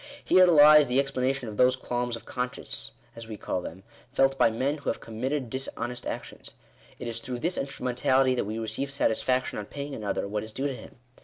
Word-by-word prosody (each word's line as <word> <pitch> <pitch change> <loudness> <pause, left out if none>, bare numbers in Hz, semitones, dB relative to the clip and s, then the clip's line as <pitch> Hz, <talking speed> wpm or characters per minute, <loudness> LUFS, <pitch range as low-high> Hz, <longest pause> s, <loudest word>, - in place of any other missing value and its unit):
Here 185 0 +6
lies 150 -3 +8
the 125 +2 +2
ex 140 0 0
planation 130 -1 -1
of 105 -1 -7
those 125 0 +5
qualms 120 -1 -2
of 115 - -11
conscience, 125 0 -4 0.3
as 115 -1 -9
we 110 -2 -7
call 90 - -3
them, 90 +2 -8 0.3
felt 135 0 +3
by 125 - +4
men 135 +7 -1
who - - -3
have - - -2
committed 130 +4 -3
dishonest 125 -1 -5
actions. - - -7 0.4
It 125 - -6
is 115 -1 -3
through 125 +1 -4
this 170 +9 -1
instrumentality 130 0 +1
that 125 - -1
we 110 +2 -4
receive 115 +5 -2
satisfaction 130 -2 0
on 105 - -6
paying 145 0 -6
another 105 -4 -2
what 105 +1 -2
is 110 0 -8
due 135 - -3
to 140 - 0
him. - - -12
125 Hz, 210 wpm, -27 LUFS, 115-135 Hz, 0.4 s, lies